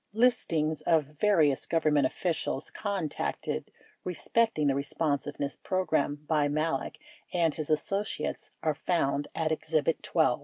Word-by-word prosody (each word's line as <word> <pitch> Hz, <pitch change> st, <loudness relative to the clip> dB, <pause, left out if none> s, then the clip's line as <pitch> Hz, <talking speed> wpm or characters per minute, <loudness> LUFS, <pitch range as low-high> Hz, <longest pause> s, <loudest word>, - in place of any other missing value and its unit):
Listings 160 Hz, -, +2 dB
of 165 Hz, -3 st, +3 dB, 0.2 s
various 160 Hz, -10 st, +3 dB
Government 150 Hz, -4 st, +3 dB
officials 165 Hz, -4 st, -2 dB
contacted 195 Hz, -7 st, -3 dB, 0.3 s
respecting 180 Hz, -1 st, +1 dB
the 140 Hz, -, +4 dB
Responsiveness 145 Hz, 0 st, -1 dB
Program 155 Hz, -6 st, 0 dB
by 150 Hz, -2 st, +3 dB
Malek 150 Hz, -1 st, -1 dB, 0.3 s
and 165 Hz, -3 st, +2 dB
his 155 Hz, -1 st, -5 dB
associates 195 Hz, +7 st, -1 dB
are 155 Hz, -, +2 dB
found 145 Hz, -3 st, 0 dB
at 160 Hz, -1 st, 0 dB
Exhibit 160 Hz, 0 st, 0 dB
12. -, -, +2 dB
155 Hz, 115 wpm, -29 LUFS, 145-175 Hz, 0.3 s, the